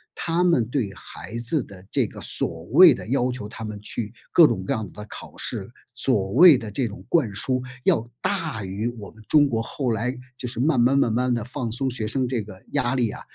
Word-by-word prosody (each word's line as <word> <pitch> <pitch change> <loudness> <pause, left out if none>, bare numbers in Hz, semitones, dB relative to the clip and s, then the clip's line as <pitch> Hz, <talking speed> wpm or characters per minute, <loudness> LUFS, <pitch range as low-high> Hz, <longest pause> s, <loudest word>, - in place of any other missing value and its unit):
他 170 +1 -1
们 170 -10 +3
对 125 -6 -1
孩 95 +5 -9
子 120 +6 +1
的 95 -1 -14
这 - - +2
个 - - -11
所 - - +1
谓 - - +9
的 - - -8
要 125 -1 +1
求 125 -5 -5
他 110 +1 -7
们 105 -1 -6
去 105 +1 -5 0.2
各 165 -3 +7
种 - - -2
各 140 - 0
样 110 -5 -3
的 105 +4 -10
考 - - -9
试， - - -1 0.2
所 95 0 +1
谓 160 - +8
的 110 -3 -7
这 120 +4 -1
种 105 - -10
灌 125 - +1
输， 130 +4 +1 0.2
要 115 -1 +2
大 160 - -1
于 100 +4 -3
我 105 -2 -9
们 110 - -17
中 145 -2 +4
国 115 -3 -1
后 125 +2 -2
来 120 +4 -2 0.2
就 125 - -5
是 120 0 -4
慢 145 -1 +2
慢 125 +3 +4
慢 120 -4 +3
慢 125 +2 +1
地 120 -2 -1
放 120 0 -4
松， 130 +4 -1
学 115 -3 -3
生 130 +4 0
这 125 -2 -1
个 105 -2 -11
压 130 -3 0
力 120 -4 +1
啊， - - -9
120 Hz, 245 characters per minute, -24 LUFS, 110-135 Hz, 0.2 s, 谓